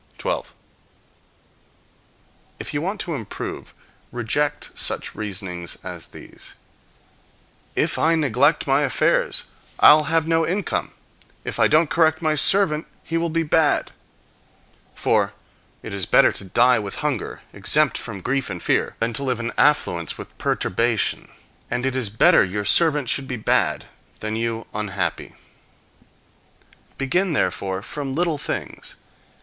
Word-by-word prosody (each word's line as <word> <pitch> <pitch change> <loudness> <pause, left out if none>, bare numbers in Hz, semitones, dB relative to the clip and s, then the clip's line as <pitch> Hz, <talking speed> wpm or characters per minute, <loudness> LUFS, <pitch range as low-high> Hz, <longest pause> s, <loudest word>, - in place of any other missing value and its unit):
12. - - -3 2.0
If - - -6
you 145 - -1
want 195 +5 -3
to 170 - -4
improve, 115 -9 -6 0.4
reject 120 +5 -1
such - - -2
reasonings 90 -5 -5
as - - -6
these: - - -12 1.2
"If - - +1
I 165 +1 +3
neglect 150 0 +2
my 135 +1 +3
affairs, 135 -5 +1 0.4
I'll 150 0 +7
have 160 +1 +1
no 165 0 +2
income; 185 +3 -1 0.5
if - - -5
I - - +6
don't 155 0 +3
correct 160 -1 +3
my 155 -2 +1
servant, 155 0 +3 0.2
he 165 - -4
will 165 0 0
be 165 +1 0
bad." 155 -1 +2 1.0
For - - +1 0.5
it - - -7
is 100 -3 -2
better - - +5
to - - -6
die 120 +6 +4
with 105 +8 -5
hunger, 135 -9 -2
exempt - - +2
from 95 - -6
grief 130 +4 -1
and 90 -2 -5
fear, - - 0
than 115 +1 -1
to 140 - -3
live 125 -3 -1
in 120 0 -3
affluence 85 - +2
with - - -10
perturbation; 115 +3 0 0.4
and 125 +1 -2
it 135 -1 0
is 125 -5 0
better 105 - +5
your 100 +2 -3
servant 150 - +3
should 135 +2 0
be 130 - -3
bad, 110 - +1 0.3
than 110 0 -3
you 115 0 -2
unhappy. 100 -3 -3 1.6
Begin 170 +7 0
therefore 95 -8 -1
from 135 +1 -5
little 165 -2 0
things. 150 - -5
135 Hz, 135 wpm, -22 LUFS, 110-155 Hz, 2.0 s, I'll